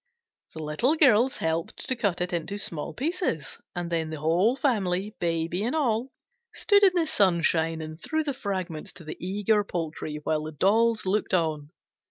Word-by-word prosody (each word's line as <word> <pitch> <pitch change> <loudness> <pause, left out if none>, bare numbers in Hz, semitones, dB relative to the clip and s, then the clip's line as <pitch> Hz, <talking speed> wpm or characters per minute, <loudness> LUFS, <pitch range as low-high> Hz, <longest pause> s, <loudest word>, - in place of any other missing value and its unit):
The 160 - -5
Little 195 - +1
Girls 260 -4 +4
helped 160 0 -2
to 260 - 0
cut 195 -6 -1
it 180 0 -2
into 175 +4 -2
small 165 -6 -2
pieces, 300 - -2 0.2
and 175 -1 -4
then 165 -2 0
the 155 -1 -5
whole 175 - +2
family, 210 -7 0
Baby, 170 +2 -1
and 245 +7 -1
all, 250 -4 0 0.4
stood 405 -2 +4
in 380 -2 +7
the 340 -2 +3
sunshine 170 - +2
and 155 +1 -9
threw 315 0 -1
the 290 -2 -2
fragments 190 - -4
to 175 - -12
the 155 - -7
eager 205 +3 +1
poultry, 160 -5 -4
while 155 0 0
the 155 - -6
dolls 220 +8 +2
looked 195 0 +1
on. 155 -4 -1
185 Hz, 175 wpm, -27 LUFS, 160-230 Hz, 0.4 s, in